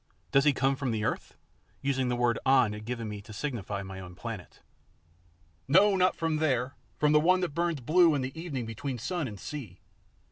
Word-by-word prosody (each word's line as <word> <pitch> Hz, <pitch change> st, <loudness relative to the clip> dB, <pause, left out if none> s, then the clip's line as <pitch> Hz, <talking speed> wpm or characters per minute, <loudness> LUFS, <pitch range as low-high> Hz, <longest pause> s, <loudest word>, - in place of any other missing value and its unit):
Does 135 Hz, +1 st, +4 dB
he 145 Hz, -, +6 dB
come 135 Hz, 0 st, +1 dB
from 135 Hz, -1 st, -2 dB
the 110 Hz, -2 st, -1 dB
earth?" -, -, -3 dB, 0.5 s
using 135 Hz, -2 st, +1 dB
the 125 Hz, -, +1 dB
word 120 Hz, -1 st, +1 dB
An 130 Hz, -5 st, +4 dB
had 105 Hz, 0 st, -8 dB
given 115 Hz, -1 st, -4 dB
me 105 Hz, -1 st, -6 dB
to 105 Hz, -, -13 dB
signify 105 Hz, -5 st, -4 dB
my 95 Hz, 0 st, -8 dB
own 90 Hz, -1 st, -10 dB
planet. 110 Hz, -3 st, -7 dB, 1.1 s
"No, 200 Hz, +2 st, +5 dB
not 185 Hz, 0 st, +3 dB
from 165 Hz, -1 st, 0 dB
there; 130 Hz, -5 st, 0 dB, 0.2 s
from 150 Hz, 0 st, +3 dB
the 150 Hz, -, +6 dB
one 185 Hz, +4 st, +4 dB
that 175 Hz, -5 st, -2 dB
burns 170 Hz, -3 st, -1 dB
blue 160 Hz, +4 st, +5 dB
in 130 Hz, -2 st, -1 dB
evening 155 Hz, -7 st, -4 dB
between 125 Hz, +4 st, -4 dB
sun 155 Hz, +5 st, -2 dB
and 105 Hz, -4 st, -8 dB
sea. 115 Hz, -12 st, -7 dB
130 Hz, 200 wpm, -29 LUFS, 115-155 Hz, 1.1 s, he